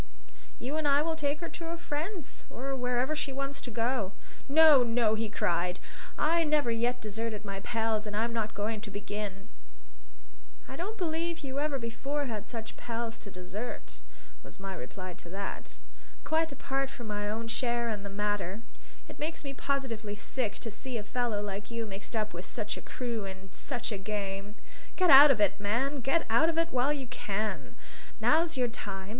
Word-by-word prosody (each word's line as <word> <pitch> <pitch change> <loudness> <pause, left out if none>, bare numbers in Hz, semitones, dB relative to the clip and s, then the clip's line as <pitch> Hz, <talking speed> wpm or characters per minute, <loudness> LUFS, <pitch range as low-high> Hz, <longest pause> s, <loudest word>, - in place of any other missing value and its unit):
"You 275 +5 -2
and 310 -2 +1
I 285 +1 +5
will 325 0 0
take 300 0 0
her 335 - -3
to 340 - -7
her 335 +1 -3
friends, 335 +1 -4
or 270 +2 -3
wherever 250 +3 +1
she 295 -2 -1
wants 275 +1 -2
to - - -5
go." 230 -3 0 0.4
"No, 305 -2 +9
no!" 230 -2 +3
he 220 0 0
cried. 180 -3 +1 0.4
"I 330 +2 +4
never 300 -5 +3
yet 240 +2 +1
deserted 220 0 -3
my 195 -1 -3
pals, 220 0 0
and 205 0 -3
I'm 230 +2 +1
not 220 -2 -1
going 210 +1 -1
to 215 - -6
begin." 205 0 -4 1.2
"I 265 - -7
don't 395 +9 -3
believe 335 -1 -1
you 275 0 -2
ever 295 -1 +1
before 270 +5 -2
had 215 -4 -4
such 225 -2 -6
pals 230 -1 -3
to 200 - -8
desert," 180 - -6 0.4
was - - -13
my 195 0 -4
reply 185 +5 -6
to 170 - -12
that. 195 +2 -5 0.5
"Quite 320 0 +2
apart 275 0 -1
from 240 -3 -8
my 205 -1 -1
own 225 +2 -2
share 235 0 +2
in 215 -3 -2
the 200 - -5
matter, 205 0 -1 0.4
it - - -10
makes 315 +2 -2
me 275 -1 -4
positively 235 -7 -1
sick 215 +1 -2
to 225 - -4
see 245 +3 -4
a 210 - -4
fellow 225 -2 0
like 200 0 -4
you 230 -1 -2
mixed 205 +2 -5
up 215 -3 0
with 175 +2 -6
such 215 -2 -2
a - - -7
crew 235 -5 -3
in 190 0 -8
such 245 0 -2
a 205 - -2
game. 200 0 -3 0.4
Get 365 -2 +5
out 280 +2 +12
of 260 -6 +5
it, 205 -1 +3
man, 250 +8 +1
get 270 +7 +2
out 235 +9 +5
of 330 - -1
it 330 0 +3
while 255 +3 +3
you 280 -3 -1
can! 205 - -2 0.4
Now's 315 +8 +4
your 250 -1 +3
time. 195 -4 -5
230 Hz, 190 wpm, -31 LUFS, 205-275 Hz, 1.2 s, out